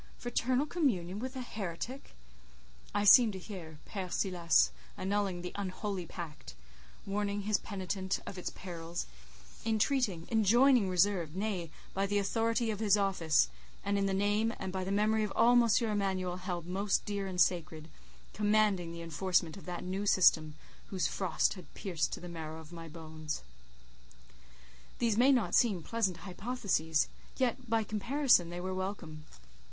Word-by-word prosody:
Fraternal 250 +3 0
communion 210 - 0
with 260 +3 -5
a 260 - -4
heretic! 220 +3 -6 0.8
I 205 0 0
seemed 220 +1 +8
to - - -5
hear 175 -5 -9
Père 190 -3 -5
Silas 170 - +3 0.3
annulling 195 -2 -1
the 180 - -4
unholy 195 -2 -4
pact; 160 -3 -8 0.5
warning 205 0 -1
his 210 0 +1
penitent 190 -1 -3
of - - -7
its 180 - -4
perils; 170 -2 -6 0.6
entreating, 220 -5 +1
enjoining 230 +1 +5
reserve, 180 -3 +1
nay, 190 -4 -2 0.2
by 195 +1 0
the 205 +1 0
authority 225 +3 +1
of 210 - -4
his 210 -2 +4
office, 190 - +3 0.4
and 200 0 +1
in 200 0 +1
the 195 - 0
name, 205 +3 +2
and 190 - -5
by 190 -1 -2
the 190 - -3
memory 215 +2 +2
of 210 - -2
all 235 +1 +5
M. 240 -1 +5 0.2
Emanuel 190 -4 -1
held 180 -2 -4
most 195 +3 0
dear 200 -1 -2
and 185 -1 -4
sacred, 160 -3 +1 0.5
commanding 210 -4 +2
the 170 0 -7
enforcement 165 0 0
of 195 - -11
that 175 -1 -4
new 190 +3 -3
system 155 -5 +4 0.3
whose 185 -2 -1
frost 190 -4 +1
had 185 - -12
pierced 175 -5 -2
to - - -4
the 175 - -8
marrow 160 -2 -6
of 160 +1 -12
my 165 -1 -8
bones. 155 - -6 1.5
These 230 -3 +1
may 250 +5 +5
not 250 -5 +2
seem 200 -8 +3
pleasant 200 -5 0
hypotheses; 185 - 0 0.3
yet, 255 -1 -1
by 225 0 +2
comparison, 215 - +2
they 175 +1 -5
were 185 +1 -3
welcome. 185 -5 -5
195 Hz, 155 wpm, -32 LUFS, 175-215 Hz, 1.5 s, seemed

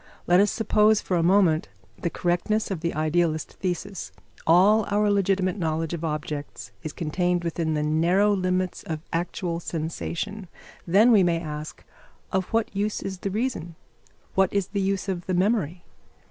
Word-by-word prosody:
Let 180 +1 +5
us 205 +1 +4
suppose 215 -1 +3
for 185 - -2
a 170 - +2
moment 170 - +3 0.3
the 170 - -2
correctness 180 +6 0
of 185 - -2
the 170 +1 -2
idealist 155 +1 0
thesis: 185 +1 -4 0.4
all 195 +6 +6
our 205 0 +2
legitimate 195 -1 +1
knowledge 160 -1 -1
of 170 -1 -4
objects 150 -2 -4
is 155 - -5
contained 175 +3 -1
within 165 -1 -1
the 150 - 0
narrow 175 +7 +3
limits 185 -1 -1
of 155 -2 -5
actual 170 0 -2
sensation; 170 +4 -4 0.4
then, 205 +8 +5
we 210 -4 +6
may 170 -2 +2
ask, 150 -2 -7 0.5
of 190 -1 0
what 225 -1 -1
use 205 +1 -1
is 190 -1 -5
the 195 - -3
reason? 210 -6 -3 0.6
What 190 -1 +3
is 200 -2 -1
the 200 0 -1
use 195 0 -1
of 180 -3 -3
the 185 - 0
memory? 180 -3 0
180 Hz, 160 wpm, -25 LUFS, 165-200 Hz, 0.6 s, all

